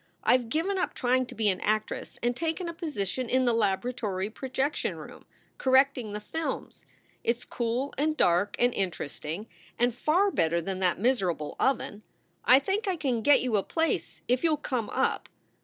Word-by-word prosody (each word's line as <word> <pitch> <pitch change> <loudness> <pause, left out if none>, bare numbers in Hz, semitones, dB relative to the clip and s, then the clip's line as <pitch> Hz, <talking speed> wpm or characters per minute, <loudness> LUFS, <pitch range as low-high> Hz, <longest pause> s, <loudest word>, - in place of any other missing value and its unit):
I - - +5
ve 250 -2 0
given 330 - -1
up - - -1
trying 255 0 +1
to - - -10
be 220 0 +1
an 185 -2 -1
actress 215 0 -1
and 240 0 +1
taken 330 +4 -2
a 335 - -4
position 255 - -3
in 255 0 +3
the 240 - +3
laboratory 210 -2 -1
projection 265 +4 -2
room, - - -11 0.3
correcting 260 -4 +3
the 210 - -4
films. 320 +10 -5 0.4
It 235 0 +1
s 245 - -14
cool 240 +4 -2
and 310 +1 +1
dark 180 +4 +3
and 245 0 +3
interesting, 170 0 -3 0.3
and 240 0 +2
far 345 - +2
better 165 - +2
than 185 +2 -4
that 180 -2 +2
miserable 190 - 0
oven. 225 -5 0 0.4
I 255 - +8
think 390 +10 -1
I 375 - +1
can 265 -8 -1
get 290 +5 +5
you 245 -4 +1
a - - +2
place, 325 - -2
if 250 +4 +1
you 325 -2 +4
ll - - +1
come 255 -7 -2
up. - - 0
245 Hz, 185 wpm, -28 LUFS, 205-285 Hz, 0.4 s, I